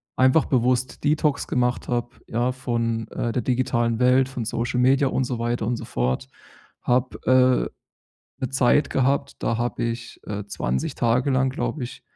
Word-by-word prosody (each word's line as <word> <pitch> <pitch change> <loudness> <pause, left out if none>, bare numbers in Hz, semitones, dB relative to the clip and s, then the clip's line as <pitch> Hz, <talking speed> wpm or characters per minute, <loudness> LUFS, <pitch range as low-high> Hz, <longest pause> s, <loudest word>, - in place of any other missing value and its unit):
einfach 130 +4 +4
bewusst 125 0 0
Detox 150 -1 +1
gemacht 125 0 0
habe, 120 -1 -1 0.2
ja, 120 +3 0
von, 115 -3 -2
äh, 120 - -3
der 125 - -1
digitalen 120 -2 0
Welt, 130 +1 +4
von 125 -4 -4
Social-Media 125 +5 +2
und 130 - 0
so 125 -2 -3
weiter 120 -1 -1
und 120 +1 -1
so - - -7
fort. 60 +1 -1 0.6
Habe, 125 +1 +1 1.2
äh, - - -18
'ne - - -1
Zeit 135 +2 +3
gehabt, 140 +2 0
da 115 - 0
habe 120 0 -2
ich, 115 +1 -5
äh, 105 -1 -5
20 65 -10 -2
Tage 125 +4 +2
lang, 130 0 +2
glaube 130 +1 -3
ich, 125 +1 -9
125 Hz, 165 wpm, -24 LUFS, 115-130 Hz, 1.2 s, einfach